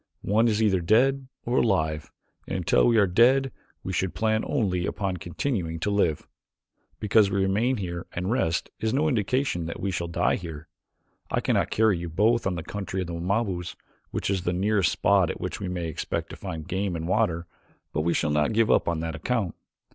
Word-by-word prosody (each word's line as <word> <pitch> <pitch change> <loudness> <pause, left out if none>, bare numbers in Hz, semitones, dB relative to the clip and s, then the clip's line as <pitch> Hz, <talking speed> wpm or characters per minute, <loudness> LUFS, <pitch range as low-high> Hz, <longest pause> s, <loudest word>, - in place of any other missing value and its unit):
One 110 +4 +3
is 110 -1 +2
either 95 -4 +3
dead 130 +8 +3 0.2
or 120 +2 0
alive, 80 -8 0 0.4
and - - -2
until 90 +5 +3
we 115 -1 +4
are 105 - +6
dead 125 +8 +4 0.3
we 95 - -4
should 95 0 -1
plan 110 0 +1
only 95 -9 0
upon 95 -3 -2
continuing 85 - -3
to 105 - 0
live. 85 -7 +1 0.7
Because 105 -1 +4
we 100 0 0
remain 110 +7 +1
here 85 -3 -5
and 90 +4 -3
rest 85 -10 0
is 110 +2 0
no 150 +3 +2
indication 120 - 0
that 85 - -6
we 100 - -1
shall 85 -2 -2
die 85 - +1
here. 80 -3 -8 0.6
I - - 0
cannot - - +1
carry 110 -5 +2
you 85 0 -5
both 110 +8 +2
to - - +2
the 90 -3 -4
country 95 -1 -4
of - - -2
the 85 - -6
Wamabos, 90 0 -2 0.3
which - - -2
is 95 -2 0
the 90 0 -1
nearest 100 0 +2
spot - - +3
at - - -4
which - - -4
we 100 - -4
may 90 -2 -3
expect 80 - -4
to - - -7
find 80 -5 -6
game 95 0 -1
and 80 0 -4
water, 90 -4 +1 0.5
but 75 - 0
we 85 +2 +1
shall 75 - +1
not 75 +7 +1
give 115 0 +3
up - - +3
on 85 -1 0
that 80 0 -3
account. 100 +4 -1
95 Hz, 205 wpm, -26 LUFS, 85-110 Hz, 0.7 s, are